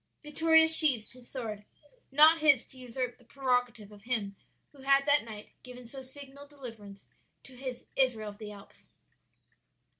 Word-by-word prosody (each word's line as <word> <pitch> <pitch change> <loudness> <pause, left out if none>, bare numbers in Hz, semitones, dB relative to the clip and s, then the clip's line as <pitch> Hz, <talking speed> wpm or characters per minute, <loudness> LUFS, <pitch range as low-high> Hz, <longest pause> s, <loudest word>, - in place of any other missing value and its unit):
"Vittoria 320 +2 +3
sheathed 295 -9 +5
his 250 -1 -17
sword. 220 -6 -6 0.5
Not 310 +4 +6
his 285 -5 +4
to 260 - -9
usurp 250 0 -5
the - - -21
prerogative 245 -4 -2
of 205 -1 -15
Him 215 -5 -1 0.4
who 285 - -20
had 275 +1 +3
that 290 0 +4
night 215 -2 -11
given 250 -1 -12
so 265 +3 -10
signal 280 +1 -13
deliverance 225 -8 -12 0.4
to 260 - -15
His 255 -1 -8
'Israel 235 -5 0
of 205 - -13
the 210 -1 -8
Alps.'" 200 -1 -16
255 Hz, 155 wpm, -29 LUFS, 225-280 Hz, 0.5 s, Not